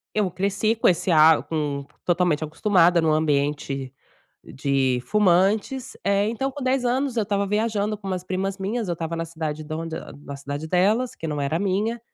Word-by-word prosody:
Eu 205 -4 +1
cresci 200 +4 0
com - - +3
esse, 180 +1 +2
ah, 160 0 +6
com 145 -3 -3 0.2
totalmente 175 -3 +2
acostumada 170 +2 +3
em - - 0
um 155 - +3
ambiente 145 -3 0 0.5
de 135 -2 0
fumantes, 210 +5 +2
eh, 200 +1 +2
então 235 +4 -2
com 275 0 -7
10 260 0 +1
anos 255 +1 0
eu 225 - +2
estava 200 -1 0
viajando 210 0 0
com 200 -1 -8
umas 185 -1 -3
primas 190 +1 -2
minhas, 210 +2 -2
eu 175 - 0
estava 165 0 -4
na 165 0 -2
cidade 160 -2 -5
da 155 +1 -5
onde, 165 0 -5
eh, - - -5 0.2
na 140 - -7
cidade 145 +2 -5
delas, 205 +9 +2
que 165 - -6
não 150 -1 -2
era 145 +4 -1
minha, 205 +4 0
180 Hz, 195 wpm, -24 LUFS, 155-210 Hz, 0.5 s, ah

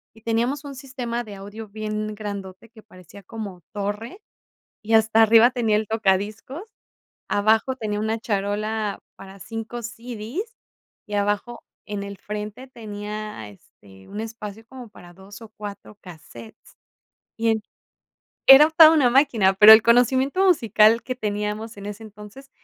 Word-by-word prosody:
y 225 - -18
teníamos 235 +6 -1
un 280 -1 -9
sistema 250 -3 -5
de 215 -3 -11
audio 205 +3 -10
bien 215 0 -5
grandote 200 0 -8
que 220 -1 -17
parecía 185 -1 -16
como 200 -3 -8
torre, 210 - -5 0.6
y 225 +1 -3
hasta 220 0 +4
arriba 225 +2 +6
tenía 230 -4 0
el 215 -1 -3
tocadiscos. 215 - -1 0.7
Abajo 220 +5 +1
tenía 210 -4 -3
una 220 +1 -2
charola 210 0 -3 0.2
para 195 0 -13
5 225 +4 -7
CDs, 240 - -7 0.5
y 210 - -7
abajo 205 +4 -2 0.2
en 205 -1 -5
el 200 0 -8
frente 210 +4 -7
tenía, 210 - -7
este, 95 -1 -19
un 205 - -6
espacio 220 -1 -8
como 255 -1 -11
para 175 -4 -16
2 195 +3 -14
o 225 - -11
4 205 0 -9
casetes 150 - -14 0.6
y 225 0 0
en 220 -1 0 0.9
Era 275 +3 +9
toda 320 -1 +8
una 295 -6 +3
máquina, 240 -7 +3
pero 210 +3 +9
el 220 - +9
conocimiento 260 - +3
musical 230 - +4
que 255 - -4
teníamos 210 0 -4
en 200 0 -9
ese 210 +2 -8
entonces 215 +5 -13
215 Hz, 145 wpm, -23 LUFS, 205-235 Hz, 0.9 s, Era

